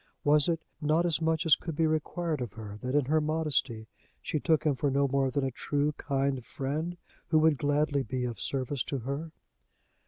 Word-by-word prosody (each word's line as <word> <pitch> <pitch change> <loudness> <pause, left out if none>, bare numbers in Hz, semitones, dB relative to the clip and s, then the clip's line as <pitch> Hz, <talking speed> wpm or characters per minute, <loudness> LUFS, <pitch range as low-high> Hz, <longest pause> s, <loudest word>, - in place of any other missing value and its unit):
Was 150 +1 +4
it 165 -1 -1 0.2
not 155 +3 +2
as 170 -1 +1
much 160 +1 +1
as 160 - +7
could 165 -3 -6
be 160 - +2
required 155 0 -1
of 120 -5 -4
her, 105 -2 -8
that, 130 +2 -2
in 145 -2 +3
her 155 +3 +2
modesty, 150 -7 0 0.3
she 155 - -2
took 160 0 +2
him 150 -3 +3
for 140 +2 0
no 140 +1 +2
more 135 0 +1
than 135 +2 -1
a 135 - 0
true, 145 +4 0
kind 135 -3 -1
friend, 150 +8 -3 0.3
who 160 - +3
would 155 -2 +4
gladly 145 0 +1
be 130 -1 -3
of 120 -5 -5
service 135 -1 -1
to 140 - -2
her? 140 +6 -4
145 Hz, 200 wpm, -29 LUFS, 135-155 Hz, 0.3 s, as